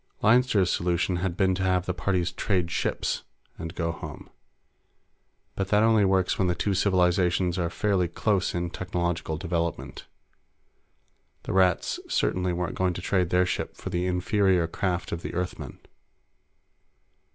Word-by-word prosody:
Leinster's 110 -5 +4
solution 90 +1 0
had 90 0 -2
been 95 -1 +3
to 95 - -3
have 90 -1 +1
the 90 - -1
parties 90 -1 0
trade 90 -4 -1
ships - - -1 0.4
and 85 +1 -6
go 85 -1 -1
home, 80 - -9 1.2
but 95 - -2
that 105 +2 +3
only 110 -2 +4
works 95 -1 +1
when 95 - +2
the 90 - +1
two 100 - 0
civilizations 90 -1 +2
are 85 -1 0
fairly 95 0 +1
close 95 +2 0
in 85 0 -2
technological 85 -3 -2
development. 85 -6 -3 1.4
The - - -4
Rats 95 -2 +2
certainly 90 0 +1
weren't 90 0 -2
going 90 -1 +2
to 85 - -6
trade 90 -2 +1
their 90 +1 +3
ship - - -3
for - - -6
the 90 +1 -1
inferior 90 0 +2
craft 90 +1 -2
of 85 - -3
the - - -6
Earthmen. 80 -7 -4
90 Hz, 150 wpm, -26 LUFS, 85-95 Hz, 1.4 s, Leinster's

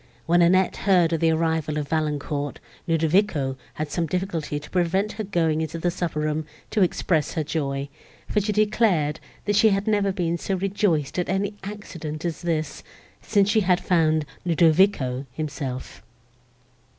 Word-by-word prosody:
When 175 +1 +4
Annette 185 +2 +3
heard 180 -4 +3
of 165 - +1
the 165 - +3
arrival 160 -2 0
of 150 -1 -2
Valancourt, 150 -2 -2 0.3
Ludovico 160 -4 +2 0.2
had 155 -1 -4
some 170 -2 -1
difficulty 165 -4 -2
to 145 - -12
prevent 190 +4 +1
her 220 - -5
going 165 -5 +1
into 160 +1 -3
the 175 +1 0
supper 170 -4 -2
room, 155 0 -1 0.2
to 215 - +1
express 170 -3 +1
her 160 - 0
joy, 140 -2 -2 0.4
for 210 - +1
she 210 +2 -1
declared, 205 -8 +2 0.3
that 205 - +1
she 220 +2 +6
had 195 0 0
never 205 -3 +2
been 170 -3 -1
so 195 - -1
rejoiced 185 -6 0
at 175 - -1
any 195 +2 0
accident 170 -6 -6
as 170 -2 -3
this, 160 -4 -2 0.4
since 200 -2 +2
she 220 +1 +3
had 180 -2 +3
found 160 -3 +2 0.2
Ludovico 160 -6 +3
himself. 140 -3 -5
165 Hz, 160 wpm, -24 LUFS, 155-190 Hz, 0.4 s, she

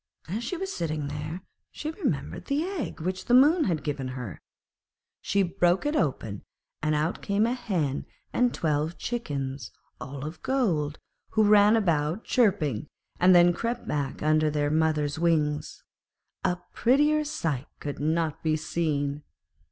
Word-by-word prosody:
As 210 +8 -3
she 350 +9 -3
was 385 +2 -4
sitting 155 -3 -2
there, 150 +5 -5 0.3
she 305 - -5
remembered 375 - -3
the 285 +2 0
egg 360 - -4
which 185 +3 -3
the 245 - +4
Moon 305 +6 +6
had 165 -6 -1
given 140 -3 -3
her; 125 - -6 0.8
she 200 0 +2
broke 175 +2 +1
it 295 +2 0
open, 115 - -1 0.4
and 155 0 +1
out 155 +4 -1
came 200 +1 +1
a 235 - +1
hen 180 - -2 0.3
and 245 -1 +3
twelve 155 +1 -1
chickens, 140 - -4 0.3
all 140 0 -6
of 155 +3 -7
gold, 170 - 0 0.4
who 215 - +4
ran 210 +1 +6
about 170 -2 +1
chirping, 170 - +1 0.3
and 180 0 +6
then 175 0 +7
crept 235 +6 -3
back 145 -2 -2
under 155 0 +3
their 145 -1 0
mother's 155 -2 +1
wings. 155 -3 0 0.6
A 180 - +1 0.2
prettier 295 +5 +3
sight 165 - -2
could 145 -1 -5
not 160 +1 0
be 155 -1 +1
seen. 150 -2 -1
165 Hz, 150 wpm, -27 LUFS, 150-225 Hz, 0.8 s, then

